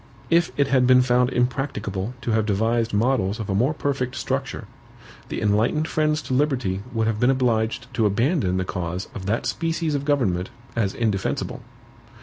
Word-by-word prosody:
If 170 0 +3
it 140 - +4
had 130 -2 +3
been 125 0 +6
found 125 0 +3
impracticable 125 -5 -2
to 120 - -2
have 110 -1 +1
devised 115 +3 +1
models 110 -2 +1
of 105 -2 -3
a - - +1
more 120 +9 +2
perfect 135 -3 -2
structure, - - -3 0.6
the - - -3
enlightened 110 +9 +1
friends 155 -1 0
to - - -4
liberty 125 -9 0
would 115 -2 0
have 110 -1 0
been 125 - +4
obliged 120 -3 +1
to 115 -4 +2
abandon 115 - +1
the 95 - -1
cause 90 0 -4
of 100 -4 -6
that 110 +3 0
species 165 -1 -1
of 140 -1 -1
government 115 -12 +1 0.3
as 105 -5 0
indefensible. 105 -5 -1
120 Hz, 170 wpm, -23 LUFS, 105-135 Hz, 0.6 s, been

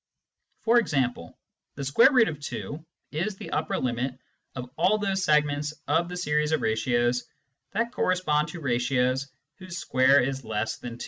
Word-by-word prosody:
For 235 +1 +5
example, 130 - -1 0.4
Vz 155 - +2 0.3
is 175 +8 -2
the - - -9
upper - - -1
limit 125 +1 -2 0.4
of 125 -1 -5
all 185 +6 +3
those 195 -2 -1
segments 150 -1 +2
of 170 +2 +1
the 180 - -5
series 150 -3 0
of 155 - +1
ratios 120 +2 +1 0.5
that 230 +3 0
correspond 170 -9 +1
to 175 - -8
ratios 130 +1 +1 0.3
whose 185 -2 -7
square 130 -2 +4
is 135 +1 -1
less 110 0 -2
than 120 -1 -7
2. - - -22
145 Hz, 140 wpm, -26 LUFS, 125-180 Hz, 0.5 s, For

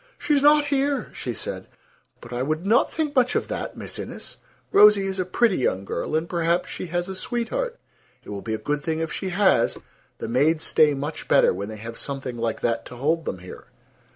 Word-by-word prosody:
"She's 295 -4 +2
not 295 +1 +6
here," 280 0 0
she - - -4
said; - - -5 0.5
"but 120 0 -10
I 120 - -2
would 155 +6 -1
not 220 +4 +3
think 305 -3 -2
much 250 -1 +3
of - - 0
that, - - -4
Miss - - -5
Innes. - - -7 0.3
Rosie 210 -2 +7
is 190 0 -3
a 185 - 0
pretty 195 +2 +2
young 95 -6 0
girl, 155 - -3
and 160 +2 0
perhaps 170 0 0
she - - -5
has 175 +1 -2
a 190 - -4
sweetheart. 250 - -3 0.5
It - - -13
will 100 -1 -5
be 110 -1 -2
a - - -3
good 145 +5 -2
thing 160 0 -1
if 160 -1 -3
she 190 - -3
has. 185 - +3 0.4
The - - -5
maids 150 +6 +2
stay 150 -2 +4
much 145 +3 -5
better - - +5
when 100 +1 -5
they 110 - -7
have 115 +2 -8
something 135 -3 -4
like 115 -1 -2
that 115 -1 0
to 125 - -10
hold 155 +6 0
them - - -3
here." 90 0 -11
165 Hz, 215 wpm, -24 LUFS, 125-215 Hz, 0.5 s, Rosie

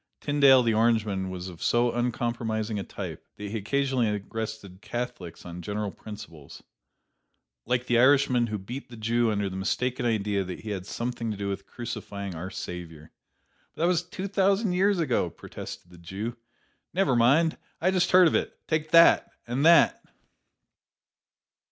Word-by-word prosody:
Tyndale 140 -3 +5
the 115 -1 +2
Orangeman 110 -4 +1
was 90 0 -6
of 85 -3 -10
so 120 0 +2
uncompromising 115 -3 -2
a - - -3
type - - -7
that 105 -1 -7
he 110 - -2
occasionally 120 -3 0
arrested 105 -4 -6
Catholics 120 -9 -6
on 90 0 -7
general 105 +2 -3
principles, 95 -11 -11 1.0
like 125 0 0
the 120 -1 +3
Irishman 130 -2 +4
who 105 -1 -3
beat 120 +9 -8
the 120 - -11
Jew 115 +1 +1
under 100 -1 -1
the 95 - -6
mistaken 125 +6 -1
idea 105 -3 0
that 90 -1 -7
he 110 - -6
had 95 -2 -5
something 120 -1 -3
to 105 - -3
do 100 0 -3
with 100 - -5
crucifying 100 -5 -6
"Our 85 +3 -6
Savior." 85 -5 -8 0.6
"But - - -2
that - - +4
was 175 -2 +2
two 185 +2 -6
thousand 195 0 +2
years 195 +2 +3
ago," 165 -3 +1
protested 90 - -10
the 90 - -14
Jew. 100 +7 -5 0.6
"Niver 190 -9 +2
moind; 140 +8 +3 0.2
I 185 +3 +2
just 185 -1 +2
heard 185 -1 +7
av - - +1
it - - -1
take 155 -1 -1
that 165 +1 +6 0.2
and 125 +4 -1
that!" 170 0 +6
115 Hz, 165 wpm, -27 LUFS, 100-135 Hz, 1.0 s, heard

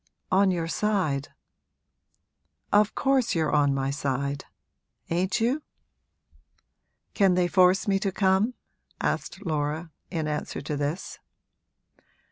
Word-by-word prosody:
'On 195 +1 +5
your 170 -3 -1
side.' 165 -8 0 1.5
'Of 210 +1 +4
course 265 -6 +2
you're 160 -3 +1
on 145 -2 +3
my 135 0 0
side, 140 0 -2 0.7
ain't 185 +6 +1
you?' 250 +7 +1 1.5
'Can 195 -4 +4
they 180 -1 +3
force 185 +3 +4
me 195 -1 +2
to 195 -1 -1
come?' 190 +5 +2 0.4
asked 200 - -2
Laura, 155 +1 -2 0.2
in 160 -4 -2
answer 150 0 -3
to 150 +1 -4
this. 145 +5 -3
180 Hz, 110 wpm, -26 LUFS, 150-195 Hz, 1.5 s, On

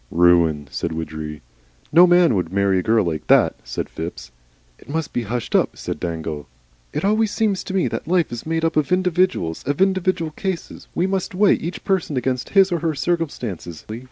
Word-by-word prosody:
"Ruin," 85 -4 +3
said - - -3
Widgery. 80 -2 -6 0.5
"No 175 +4 +7
man 175 -5 +5
would 90 -4 -1
marry 100 -1 +2
a - - 0
girl 110 +1 +2
like 80 -2 -3
that," - - +4
said - - -4
Phipps. 65 -7 -7 0.5
"It - - -18
must 160 0 -3
be 120 - 0
hushed 120 +2 -4
up," - - +2
said - - -5
Dangle. 80 -3 -4 0.4
"It - - -2
always 215 +1 +2
seems 205 -3 0
to 190 - -5
me 190 - +2
that - - -4
life 175 -1 +2
is 120 -1 -5
made 165 0 -1
up 165 - 0
of 155 0 +1
individuals, 180 - +1
of 145 0 -1
individual 185 -3 +1
cases. 190 +1 -5
We 175 - +1
must 190 -1 -2
weigh 200 +1 +5
each 175 +2 -4
person 180 -7 0
against 125 0 -1
his 195 -1 +6
or 170 - 0
her 160 -1 -1
circumstances. 125 - -3
145 Hz, 190 wpm, -21 LUFS, -, 0.5 s, No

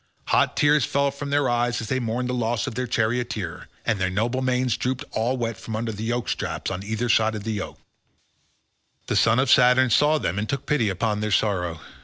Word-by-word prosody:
Hot - - +2
tears 145 -1 +4
fell 140 +2 +1
from 140 +1 -6
their 145 -1 +2
eyes 120 0 0
as 115 - -4
they 130 +4 -1
mourned 120 +1 -2
the 125 - -2
loss 120 0 -1
of 135 - -4
their 125 +2 -3
charioteer, 115 -5 -2 0.2
and 110 -4 0
their 90 - +1
noble 115 +7 -1
manes 125 -1 +1
drooped 130 +3 -2
all 120 +4 0
wet 115 -2 -3
from 115 -1 -6
under 115 +1 -2
the 105 +1 -6
yoke 120 +1 -2
straps - - -3
on 90 - -4
either 110 +4 -2
side 110 -1 +3
the 105 +1 -4
yoke. 105 -2 -5 1.3
The - - -2
son 115 0 +4
of 130 0 +2
Saturn 125 0 +5
saw 150 +6 +4
them 95 - -2
and 105 - -3
took 140 -1 -3
pity 130 -8 +1
upon 105 +3 -1
their 105 0 -2
sorrow. 90 -6 0
120 Hz, 215 wpm, -24 LUFS, 110-130 Hz, 1.3 s, Saturn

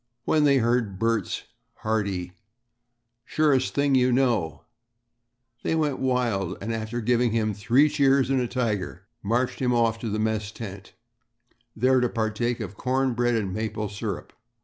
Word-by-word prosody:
When 155 -1 +3
they 140 -1 +5
heard 115 -5 +1
Bert's 115 -2 -1 0.3
hearty 100 -5 -2 0.9
"Surest 140 -2 +1
thing 140 -1 +2
you 130 -1 +4
know," 120 -11 +1 1.0
they - - 0
went 150 -4 0
wild, 120 -8 0
and 115 +3 -3
after 115 +2 -3
giving 120 0 +2
him 110 -2 +1
"three 120 +9 +3
cheers 140 -3 +3
and 135 -1 +2
a 125 - -1
tiger," 105 -8 -2 0.2
marched 120 +4 0
him 125 -1 +2
off 115 -1 +2
to 115 - -4
the 105 - -2
mess 110 -1 -1
tent, 100 -4 -9 0.8
there 130 +3 +3
to 125 -1 +1
partake 115 +2 -1
of 100 -3 -6
corn 130 0 0
bread 120 0 +1
and 100 -4 -1
maple 110 0 -3
syrup. 105 0 -5
115 Hz, 150 wpm, -25 LUFS, 105-130 Hz, 1.0 s, they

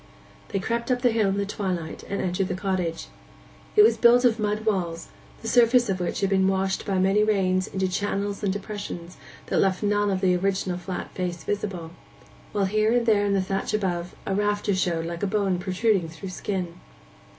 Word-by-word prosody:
They - - -2
crept 235 +5 -2
up 250 0 0
the 245 - +5
hill 220 -3 +2
in 195 - -1
the 200 - 0
twilight, 185 -5 -3
and 200 - -2
entered 185 +1 0
the 185 - -2
cottage. 185 -4 -2 0.7
It 210 - +8
was 225 +1 +5
built 245 +1 +6
of 230 -2 +3
mud 210 +1 -1
walls, 175 -6 -1 0.3
the - - -5
surface 240 0 +4
of 190 -1 0
which 180 - -2
had 195 - +2
been 190 -1 +3
washed 190 0 0
by 195 -2 +1
many 195 +3 +3
rains 185 -3 +1
into 190 0 -1
channels 200 +1 -2
and 200 - +2
depressions 200 -3 -6 0.3
that - - 0
left 190 +1 +1
none 205 0 +2
of 190 -1 -1
the 185 -2 +3
original 185 -1 -1
flat 180 +1 -5
face 180 -2 -4
visible; 190 -5 -3 0.6
while 200 -2 +1
here 215 +3 +2
and 240 -1 +2
there 210 -3 +4
in 200 - +1
the 190 - +1
thatch 195 +2 -2
above 180 -4 -2
a 195 - -1
rafter 205 0 +1
showed 175 -3 0
like 170 0 -5
a 205 - +1
bone 195 -3 0
protruding 185 -1 +1
through 165 +4 -8
the - - -8
skin. 180 -4 -4
195 Hz, 205 wpm, -25 LUFS, 185-210 Hz, 0.7 s, It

